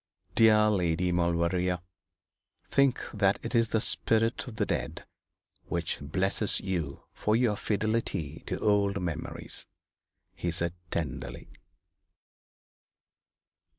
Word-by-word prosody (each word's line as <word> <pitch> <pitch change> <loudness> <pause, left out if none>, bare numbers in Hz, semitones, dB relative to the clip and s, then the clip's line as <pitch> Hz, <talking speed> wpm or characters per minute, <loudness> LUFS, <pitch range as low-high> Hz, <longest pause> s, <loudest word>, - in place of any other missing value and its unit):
'Dear 110 -1 +6
Lady 90 -2 +1
Maulevrier, 90 +1 +1 0.9
think 140 -2 +3
that 100 -2 +3
it - - -4
is 115 -1 +4
the 110 - +2
spirit 115 +3 +1
of 120 - -7
the - - +1
dead - - -3 0.6
which - - -1
blesses 95 +7 0
you 85 -7 -3
for 105 - +1
your 115 -3 +3
fidelity 105 -8 -1
to - - -2
old 100 -1 +2
memories,' 85 -3 -4 0.7
he 85 - -3
said, 85 0 +1 0.2
tenderly. 65 -6 -4
95 Hz, 105 wpm, -29 LUFS, 85-110 Hz, 0.9 s, Dear